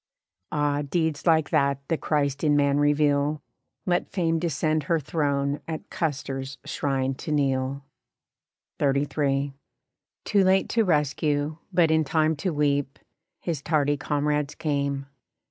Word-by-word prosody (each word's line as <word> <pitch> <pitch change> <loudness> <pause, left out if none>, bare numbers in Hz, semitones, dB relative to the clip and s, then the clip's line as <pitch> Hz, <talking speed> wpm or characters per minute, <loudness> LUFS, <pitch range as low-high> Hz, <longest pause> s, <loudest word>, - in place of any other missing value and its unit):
Ah! 145 -1 +1
deeds 160 +1 -1
like 160 -2 +3
that 140 -1 +2
the 165 - +1
Christ 140 -2 -1
in 150 -2 +4
man 140 0 +3
reveal 145 0 +2 0.4
Let 175 -1 0
Fame 165 -4 0
descend 155 -2 0
her 165 -1 +3
throne 140 -2 -1
at 160 -1 -6
Custer's 135 -3 -3
shrine 135 -2 -1
to 145 +4 -6
kneel. 135 -1 0 1.0
XXXIII. 140 0 +1 0.7
Too 200 -2 +3
late 190 +1 +3
to 230 - +2
rescue, 150 -2 0
but 170 -3 +3
in 160 0 +3
time 155 +2 +1
to 185 +4 -1
weep, 145 -2 0 0.4
His 165 -5 -3
tardy 145 -2 +1
comrades 145 0 -1
came. 140 -2 -1
145 Hz, 130 wpm, -25 LUFS, 140-160 Hz, 1.0 s, in